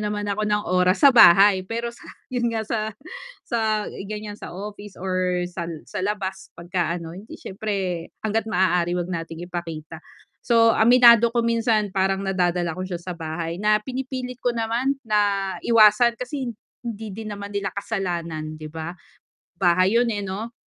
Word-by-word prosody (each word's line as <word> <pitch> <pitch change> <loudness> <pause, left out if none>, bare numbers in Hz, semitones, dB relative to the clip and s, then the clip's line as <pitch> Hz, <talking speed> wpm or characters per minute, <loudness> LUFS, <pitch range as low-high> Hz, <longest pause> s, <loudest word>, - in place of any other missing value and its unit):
naman 210 0 -2
ako 210 +1 -1
ng 210 0 +1
oras 185 - +2
sa 280 - +10
bahay 195 -3 +7
pero 235 +3 -3
sa - - -16 0.3
'yun 240 -1 0
nga 220 - -1
sa 220 -1 -2 0.5
sa 220 -2 0 0.2
ganiyan 210 -1 -6
sa - - -8
office 205 0 -8
or 185 -1 0
sal 170 -1 -5 0.2
sa - - -4
labas 190 -2 -3
pagka 175 -1 -2
ano 165 -1 -8
hindi 205 +4 -10
siyempre, 190 -4 -4 0.2
hangga't 220 0 0
maaari 180 -3 +2
huwag 175 0 -2
nating 165 0 -5
ipakita. 165 -3 -6 0.5
So, 230 -1 +5
aminado 235 0 +7
ko 235 -1 +1
minsan 225 -3 +1
parang 195 0 +1
nadadala 180 -3 0
ko 185 - -4
siya 180 - -3
sa 180 +1 -6
bahay, 165 0 -4
na 210 0 +4
pinipilit 255 -1 -5
ko 245 - +1
naman 235 +5 0
na 205 -3 +1
iwasan 230 +1 +5
kasi 255 +1 -4 0.4
hindi 225 -2 -5
din 220 +2 -7
naman 200 0 -7
nila 200 -1 -2
kasalanan 170 -7 -3
'di 155 0 -8
ba. 160 +2 -6 0.6
Bahay 185 +3 +3
'yun, 240 0 +2
eh, 205 - -3
'no 210 +5 -5
200 Hz, 165 wpm, -23 LUFS, 180-225 Hz, 0.6 s, sa